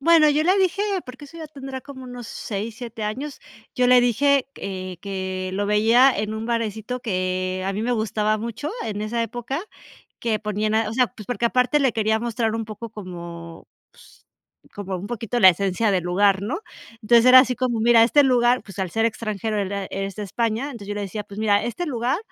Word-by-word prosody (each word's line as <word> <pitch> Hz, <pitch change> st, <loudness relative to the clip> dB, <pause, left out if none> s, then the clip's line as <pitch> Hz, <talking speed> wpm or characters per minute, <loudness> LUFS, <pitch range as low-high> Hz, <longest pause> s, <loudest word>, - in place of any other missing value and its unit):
Bueno, 320 Hz, 0 st, +6 dB
yo 295 Hz, +1 st, +2 dB
le 370 Hz, +4 st, +4 dB
dije, 380 Hz, +1 st, +1 dB, 0.2 s
porque 260 Hz, +3 st, -10 dB
eso 330 Hz, +4 st, -12 dB
ya 315 Hz, -2 st, -7 dB
tendrá 270 Hz, -3 st, -7 dB
como 260 Hz, -2 st, -10 dB
unos 245 Hz, -2 st, -8 dB
6, 215 Hz, +1 st, -5 dB
7 230 Hz, -2 st, -7 dB
años, 260 Hz, +8 st, -4 dB, 0.3 s
yo 250 Hz, -1 st, +2 dB
le 250 Hz, 0 st, +7 dB
dije, 270 Hz, +3 st, +2 dB
eh, 185 Hz, -2 st, -6 dB
que 190 Hz, -1 st, -4 dB
lo 205 Hz, +1 st, -1 dB
veía 230 Hz, +6 st, +5 dB
en 210 Hz, +1 st, -2 dB
un 220 Hz, +1 st, -4 dB
barecito 230 Hz, +1 st, -2 dB
que 185 Hz, -3 st, -2 dB
a 195 Hz, -, -1 dB
mí 205 Hz, +2 st, -3 dB
me 245 Hz, -, -1 dB
gustaba 215 Hz, -1 st, 0 dB
mucho 235 Hz, +6 st, -5 dB
en 210 Hz, -1 st, -3 dB
esa 230 Hz, +2 st, -2 dB
época, 240 Hz, +5 st, -4 dB, 0.6 s
que 225 Hz, -2 st, 0 dB
ponían 215 Hz, 0 st, -1 dB
o 215 Hz, -, -4 dB
sea, 250 Hz, -2 st, +3 dB
pues, 210 Hz, +2 st, -12 dB
porque 240 Hz, -1 st, 0 dB
aparte 250 Hz, +4 st, +2 dB
le 265 Hz, -4 st, +2 dB
quería 220 Hz, 0 st, +1 dB
mostrar 230 Hz, -1 st, -1 dB
un 225 Hz, 0 st, -2 dB
poco 215 Hz, +1 st, -8 dB
como, 170 Hz, -4 st, -9 dB, 0.3 s
pues, -, -, -20 dB, 0.5 s
como 195 Hz, -2 st, -4 dB
un 190 Hz, +3 st, -6 dB
poquito 240 Hz, 0 st, -3 dB
la 190 Hz, -, +9 dB
esencia 195 Hz, +4 st, 0 dB
de 185 Hz, -, +2 dB
lugar, 190 Hz, +2 st, +2 dB
¿no? 260 Hz, -, -3 dB, 0.4 s
Entonces 235 Hz, +2 st, +5 dB
era 255 Hz, 0 st, +10 dB
así 255 Hz, -1 st, +1 dB
como 245 Hz, -3 st, -1 dB
mira 230 Hz, 0 st, +6 dB
este 290 Hz, +5 st, +5 dB
lugar 245 Hz, -1 st, +3 dB
pues, 195 Hz, -1 st, -13 dB
al 185 Hz, -3 st, -2 dB
ser 225 Hz, +5 st, 0 dB
extranjero, 215 Hz, -1 st, -3 dB
él 195 Hz, -, -2 dB
era 200 Hz, -1 st, -3 dB
es 195 Hz, 0 st, -5 dB
de 210 Hz, -, -4 dB
España. 230 Hz, +5 st, -1 dB
Entonces 235 Hz, -8 st, -8 dB
yo 205 Hz, -, -3 dB
le 205 Hz, -, -3 dB
decía: 200 Hz, +2 st, -4 dB
"Pues 200 Hz, -, -11 dB
mira, 205 Hz, -2 st, +3 dB
este 345 Hz, +9 st, -3 dB
lugar, 255 Hz, +3 st, -1 dB
225 Hz, 210 wpm, -23 LUFS, 200-250 Hz, 0.6 s, era